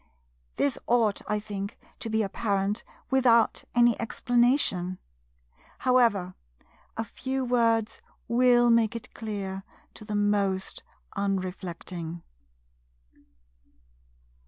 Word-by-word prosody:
This 280 -4 0
ought, 230 -4 +2
I 210 0 +1
think, 205 0 -6 0.2
to 225 - -5
be 220 0 +1
apparent 200 0 -1 0.3
without 245 -4 +4
any 240 -1 +4
explanation. 235 -6 +1 0.8
However, 230 -8 +3 0.6
a 225 - 0
few 260 +4 -3
words 230 -3 +1 0.3
will 240 0 +5
make 230 -1 +3
it 230 - -7
clear 200 -3 -4 0.3
to - - -12
the 210 0 -4
most 200 -2 0 0.3
unreflecting. 180 -3 -4
220 Hz, 90 wpm, -27 LUFS, 195-240 Hz, 0.8 s, will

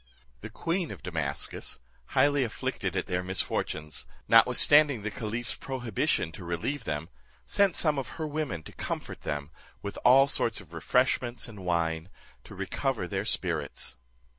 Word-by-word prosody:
The 110 - -8
queen 170 - -1
of - - -9
Damascus, 80 -9 -3 0.3
highly 145 -1 +3
afflicted 115 - -3
at - - 0
their 90 0 -1
misfortunes, 80 -4 -2 0.2
notwithstanding 125 +2 +6
the 110 - -2
caliph's 115 +3 -3
prohibition 120 -10 -1
to 80 - -9
relieve 85 - -3
them, 75 +1 -2 0.4
sent 200 -2 +3
some 150 -4 +2
of 130 - -5
her 160 - -2
women 145 - -3
to - - -10
comfort - - -5
them, 75 +1 -4 0.3
with 100 - -5
all 130 +3 +8
sorts 130 -4 +1
of 85 -5 -14
refreshments 125 +7 +1
and 105 -5 -10
wine, 85 -1 0 0.4
to - - -11
recover - - -2
their - - -2
spirits. - - 0
110 Hz, 145 wpm, -29 LUFS, 85-135 Hz, 0.4 s, all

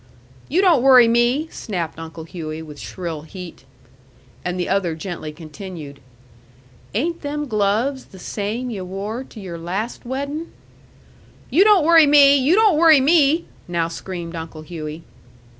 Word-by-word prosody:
"You 345 +7 +2
don't 350 -9 +4
worry 255 -2 +7
me!" 240 +6 +2
snapped 175 -6 -5
Uncle 165 0 -8
Hughey, 160 -2 -7
with 150 -2 -11
shrill 170 -5 -6
heat. 170 -3 -10 0.8
And 180 0 -3
the 175 - -1
other 185 -4 0
gently 160 -2 -6
continued, 155 -2 -9 1.0
"Ain't 335 +9 -1
them 295 0 -3
gloves 220 +5 0
the 190 - -15
same 215 +6 -4
yu' 195 -4 -5
wore 200 +6 -5
to 225 - -13
your 175 -4 -7
last 195 +8 -4
weddin'?" 280 +6 -4 1.0
"You 335 +9 +6
don't 410 -7 +5
worry 325 -2 +7
me! 285 -1 +7
You 280 +5 +3
don't 420 -7 +4
worry 320 -3 +7
me!" 305 +3 +3 0.2
now 170 -1 -1
screamed 170 0 -7
Uncle 160 -1 -7
Hughey. 155 -1 -7
205 Hz, 145 wpm, -21 LUFS, 170-280 Hz, 1.0 s, worry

